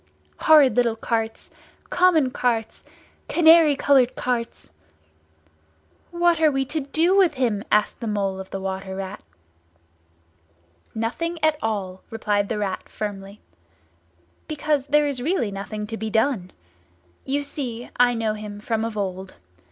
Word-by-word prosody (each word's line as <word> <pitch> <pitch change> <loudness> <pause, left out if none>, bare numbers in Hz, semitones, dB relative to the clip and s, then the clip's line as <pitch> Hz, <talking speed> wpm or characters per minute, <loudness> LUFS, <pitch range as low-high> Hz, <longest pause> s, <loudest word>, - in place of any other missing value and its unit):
Horrid 300 -5 +6
little 235 -2 +2
carts—common 255 +7 -1
carts—canary 295 +7 +2
coloured 270 -3 +3
carts!" 235 - -3 1.4
"What 345 -1 +2
are 310 - +6
we 270 -2 -1
to 315 - 0
do 320 +6 +1
with 365 -6 +4
him?" 230 -6 0
asked 210 0 +2
the 230 - -5
Mole 200 -2 -1
of 190 - -8
the 195 - -5
Water 190 0 -5
Rat. 190 - -6 1.7
"Nothing 335 +10 -2
at 310 -1 +2
all," 190 -4 -3
replied 205 -2 -1
the - - -2
Rat 195 -3 -3
firmly. 200 -1 -6 1.1
"Because 300 -2 -1
there 295 +1 +3
is 280 -4 -2
really 255 - 0
nothing 205 +2 -5
to 225 +2 -6
be 220 0 -4
done. 220 -4 0 0.7
You 285 +2 -1
see, 250 -5 -6
I 245 0 +4
know 225 -2 -1
him 210 -1 -8
from 220 +1 -2
of 225 -1 -4
old. 190 -1 -4
230 Hz, 130 wpm, -23 LUFS, 205-290 Hz, 1.7 s, Horrid